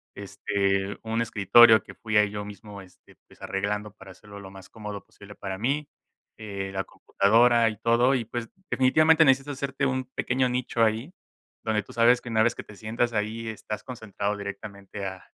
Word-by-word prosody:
este, 100 0 -2
un 115 +1 -1
escritorio 110 0 +6
que - - -12
fui 110 -1 -5
ahí 105 -1 +5
yo 105 0 -5
mismo, 105 0 -10
este, 90 -1 -19
pues, - - -21
arreglando 105 +2 -3
para 95 -1 -14
hacerlo 100 +2 -13
lo 95 -1 -10
más 95 -1 -13
cómodo 105 -2 -8
posible 100 0 -15
para 95 -1 -6
mí, 140 +7 -1 0.5
eh, 100 -3 -6
la 95 0 -2
computadora 115 +3 +3
y 110 - -2
todo, 120 +4 +3
y, 120 - -1
pues, 115 0 -6 0.2
definitivamente, 155 +5 +4
necesitas 135 +1 +2
hacerte 140 0 -2
un 130 -1 -1
pequeño 130 0 -1
nicho 125 -1 -2
ahí 115 +10 -2 0.5
donde 105 -2 -1
tú - - -14
sabes 120 +1 +4
que - - -9
una 110 -1 +2
vez 115 +1 +2
que - - -7
te 105 - -14
sientas 115 +3 -1
ahí, 110 +1 -3
estás 110 0 -6
concentrado 105 -4 -4
directamente 100 0 -7
a 95 -1 -7
110 Hz, 185 wpm, -26 LUFS, 100-120 Hz, 0.5 s, escritorio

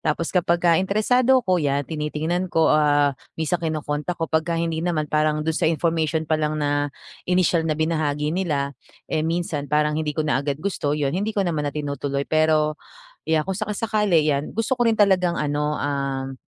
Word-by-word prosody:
Tapos 160 +1 -1
kapagka 175 -1 +3
interesado 245 +6 +2
ako, 185 -3 +2
'yan 140 -1 0
tinitingnan 160 +4 -2
ko, 165 -1 +3
ah, 145 -2 +3 0.2
minsan 160 +2 -1
kino-contact 155 +1 -2
ko. 165 - -1
Pagka 160 +1 0
hindi 165 -1 -1
naman, 170 -3 0
parang 150 0 0
do'n 160 - 0
sa 160 - +1
information 160 -1 0
pa 155 0 0
lang 155 0 -1
na 145 -1 0 0.4
inisyal 180 -2 +2
na 155 - 0
binahagi 155 -2 0
nila, 150 -6 -1 0.4
eh, 155 - +1
minsan 160 -3 -2
parang 150 +1 +2
hindi 150 -1 -2
ko 155 - 0
na 145 -3 +1
agad 140 0 -2
gusto 150 -3 -2
'yon, 140 -2 -1
hindi 205 +5 -2
ko 200 - +2
naman 155 -4 -1
na - - -5
tinutuloy. 140 -1 -2
Pero, 155 -1 +1 0.4
yeah, 160 -1 +2
kung 190 - -1
saka-sakali, 210 -5 +1
'yan, 145 0 0
gusto 225 +4 -1
ko 245 - +1
rin 225 -2 +1
talagang 185 -4 +3
ano, 150 0 -1
um, 135 -2 -2
155 Hz, 180 wpm, -23 LUFS, 150-175 Hz, 0.4 s, kapagka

